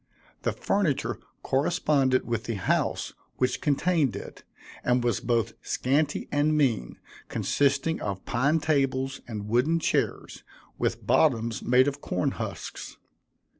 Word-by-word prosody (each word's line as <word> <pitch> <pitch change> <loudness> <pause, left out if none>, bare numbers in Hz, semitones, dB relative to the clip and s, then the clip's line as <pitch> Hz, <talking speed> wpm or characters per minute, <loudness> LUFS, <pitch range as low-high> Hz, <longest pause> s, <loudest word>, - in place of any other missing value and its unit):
The - - 0
furniture 135 - 0 0.2
corresponded 135 -2 +2
with 115 -1 -2
the 115 - -2
house 95 - 0 0.2
which 125 - 0
contained 150 - +2
it, - - -9 0.4
and 125 0 +2
was 120 -1 +1
both 115 -2 0
scanty 145 +3 0
and 150 +1 +2
mean, 120 - +1 0.3
consisting 145 +3 +1
of 100 -2 -4
pine 140 +6 +2
tables 135 -3 0
and 105 -3 -5
wooden 125 +9 +2
chairs, - - -1 0.4
with - - -1
bottoms 115 0 +2
made 125 +2 +4
of 145 0 -2
cornhusks. 90 - -4
130 Hz, 120 wpm, -27 LUFS, 120-145 Hz, 0.4 s, made